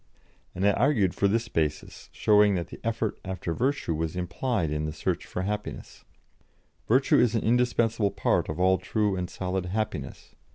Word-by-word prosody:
And 95 +2 -1
I - - +6
argued 105 -5 +2
for 100 - +2
this 115 +3 0
basis, 80 -5 -3
showing 105 -1 +4
that 85 -2 -3
the - - -10
effort 115 -2 -2
after 95 -3 -4
virtue 130 - 0
was 80 +1 -3
implied 90 - -1
in 75 0 -1
the 75 - -3
search 80 - -2
for 90 - -4
happiness: 105 +1 -5 0.8
"Virtue 130 +4 +4
is 120 -1 +3
an 110 - 0
indispensable 115 -2 +2
part - - 0
of 80 +2 -4
all 95 +1 +3
true 105 -3 0
and 90 -1 -3
solid 95 -1 -3
happiness.... 95 -7 -4
100 Hz, 170 wpm, -27 LUFS, 90-115 Hz, 0.8 s, I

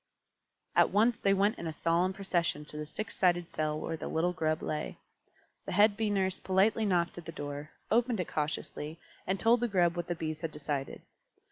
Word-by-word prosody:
At - - +6
once 220 +3 +3
they 195 - +2
went 205 +3 +2
in 170 - -4
a - - -2
solemn 170 +4 +1
procession 175 -6 -1
to 150 - -10
the 150 0 -4
six 215 +7 -5
sided 175 -2 +2
cell 155 0 -1
where 165 - -3
the - - -6
little 175 +3 +1
Grub 155 -2 0
lay. 150 0 -3 0.7
The - - -2
head 205 0 +5
Bee 220 0 0
Nurse 190 -2 0
politely 205 +4 +2
knocked 175 -2 +1
at 170 - -12
the 165 - -5
door, 145 -1 -6 0.2
opened 235 -1 +2
it 180 - -1
cautiously, 150 +1 -3 0.3
and 190 0 0
told 235 +2 +4
the 240 - +1
Grub 175 -5 +2
what 175 -1 -3
the 175 - -1
Bees 155 -1 -4
had 165 - -2
decided. 145 -2 -4
175 Hz, 205 wpm, -31 LUFS, 155-200 Hz, 0.7 s, At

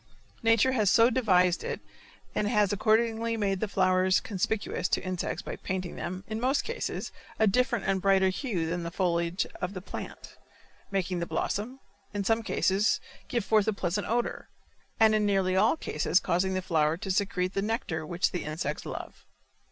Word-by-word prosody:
Nature 225 +2 +4
has 215 -6 +2
so 230 +4 +5
devised 185 -8 +3
it - - -3 0.5
and 210 - 0
has 210 -2 +2
accordingly 225 +2 +1
made 195 -3 0
the 220 - -1
flowers 185 -1 +3
conspicuous 200 -2 -2
to - - +1
insects 185 -1 -3
by - - -5
painting 185 -1 -4
them, 185 +2 -5
in 220 0 -3
most 265 +3 +2
cases, 470 - -4 0.3
a 220 - +4
different 245 +4 +1
and 195 -1 +1
brighter 195 -1 +4
hue 185 - -2
than 170 +2 -2
the 170 - -4
foliage 170 0 0 0.2
of 180 +2 -3
the - - -3
plant, 185 - -8 0.5
making 185 -2 -1
the 170 - -3
blossom, 235 +6 -2 0.4
in 205 - 0
some 225 +3 +2
cases, 195 0 +1 0.3
give 235 -5 -1
forth 215 -2 +3
a 220 - +2
pleasant 195 +1 -2
odor, 235 +1 -2 0.5
and 220 -1 +6
in 215 -1 +2
nearly 195 -2 +2
all 215 +11 +4
cases 190 - +1
causing 190 +2 0
the 185 - -1
flower 160 -2 +1
to 190 - -3
secrete 185 -1 0
the 195 - 0
nectar 210 -7 -2
which 170 +3 0
the 180 - -3
insects 155 -1 -4
love. - - -7
195 Hz, 175 wpm, -28 LUFS, 180-220 Hz, 0.5 s, and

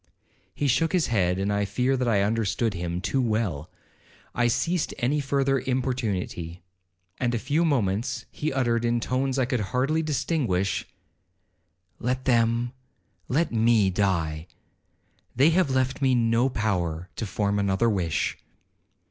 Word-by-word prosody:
He 145 - 0
shook 165 +6 +2
his 180 -4 +2
head 90 -3 +2
and 100 +1 0
I 100 0 +1
fear 125 +6 0
that 125 -1 -1
I 100 -4 +3
understood 110 +1 0
him 85 0 -3
too 130 +6 0
well. 105 - -1 0.6
I 120 -1 +2
ceased 165 +8 0
any 140 +5 +1
further 135 -1 +1
importunity; 110 -10 -2 0.6
and 120 -1 0
a - - +1
few 145 +8 0
moments 115 - 0
he 155 +1 -2
uttered, 120 -3 +1
in 120 0 +1
tones 130 +3 -1
I 130 - +2
could 125 -1 -1
hardly 130 +9 0
distinguish, 135 - -1 1.1
'Let 125 +2 -2
them, 120 0 +2 0.5
let 155 +7 +1
me 115 -3 +3
die.—They 90 - -2
have 175 -2 +2
left 130 +1 0
me 130 -2 +3
no 115 +2 +2
power 90 -7 -2
to 115 - -2
form 100 +1 0
another 100 +3 +1
wish.' 90 -7 0
120 Hz, 140 wpm, -26 LUFS, 100-130 Hz, 1.1 s, I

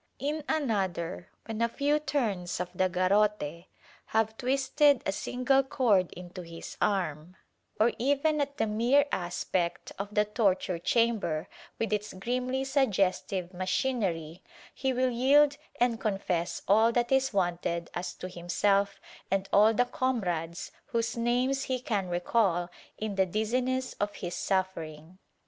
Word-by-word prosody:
In 295 +4 -2
another, 190 - -1 0.2
when 225 0 -4
a 235 - +3
few 290 +4 +1
turns 210 - -1
of 180 0 -3
the 185 0 +1
garrote 185 -3 +1 0.4
have 220 0 +1
twisted 275 +2 +2
a - - +1
single 255 +6 +1
cord 235 -9 +2
into 180 +1 -9
his 165 -1 -9
arm 180 -4 -1 0.2
— - - -39
or 225 +2 +5
even 285 +4 +2
at 280 0 -3
the 225 - +2
mere 235 +7 +3
aspect 175 0 -2
of 200 +1 -4
the 210 0 +4
torture 195 -5 0
chamber, 215 -7 +1 0.3
with 225 -1 -1
its 210 0 -2
grimly 250 +6 -2
suggestive 195 -8 0
machinery 185 -4 -1 0.2
— - - -21
he 265 0 -1
will 255 0 +1
yield 280 +4 +4 0.2
and 240 -2 +2
confess 185 -4 -1
all 220 +4 +5
that 240 +1 0
is 265 0 +3
wanted 175 -3 -1
as 175 0 -4
to - - -6
himself 195 +3 0 0.3
and 195 0 0
all 210 +2 +7
the 245 +3 +2
comrades 180 -11 -2 0.2
whose 230 -1 -1
names 250 +3 +1
he 255 -1 -1
can 205 -7 -2
recall 175 0 +1 0.3
in 215 -1 -3
the 190 -1 +2
dizziness 250 +6 -1
of 205 0 -1
his 175 -3 -5
suffering. 180 -3 -3
210 Hz, 145 wpm, -29 LUFS, 180-250 Hz, 0.4 s, all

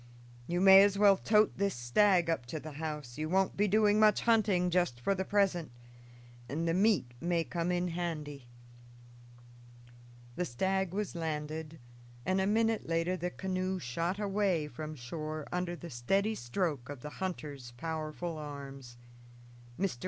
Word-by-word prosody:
You 175 +1 0
may 190 0 +9
as 200 0 +3
well 200 -1 +6
tote 210 0 +2
this 200 -1 +1
stag 175 +9 +3
up 150 -7 -1
to 155 +5 -4
the 155 +1 -8
house. 150 -3 -6
You 155 0 -2
won't 190 +1 +2
be 205 +1 +2
doing 210 +1 +4
much 215 -1 +5
hunting 205 -6 +3
just 175 -9 +1
for 160 +11 +1
the 190 -1 -2
present, 190 -6 +1 0.8
and 165 +4 -2
the 165 - +2
meat 190 - +2
may 170 -1 +1
come 170 +1 -2
in 180 0 0
handy." 155 -6 -4 1.9
The 180 - 0
stag 190 +6 -1
was 205 +1 -3
landed, 160 -1 -4 0.5
and 190 +1 +1
a 190 - +1
minute 225 +1 +1
later 165 +2 0
the 180 0 -3
canoe 185 0 -2
shot 170 +5 -2
away 195 -6 0
from 155 +3 -7
shore 155 +4 -5
under 180 -1 -2
the 170 0 -9
steady 195 - +1
stroke 140 - -2
of 145 -3 -7
the 150 - -6
hunter's 145 -9 -4
powerful 160 +2 -4
arms. 140 -4 -8 0.8
Mr. 185 -10 -1
175 Hz, 155 wpm, -32 LUFS, 150-195 Hz, 1.9 s, may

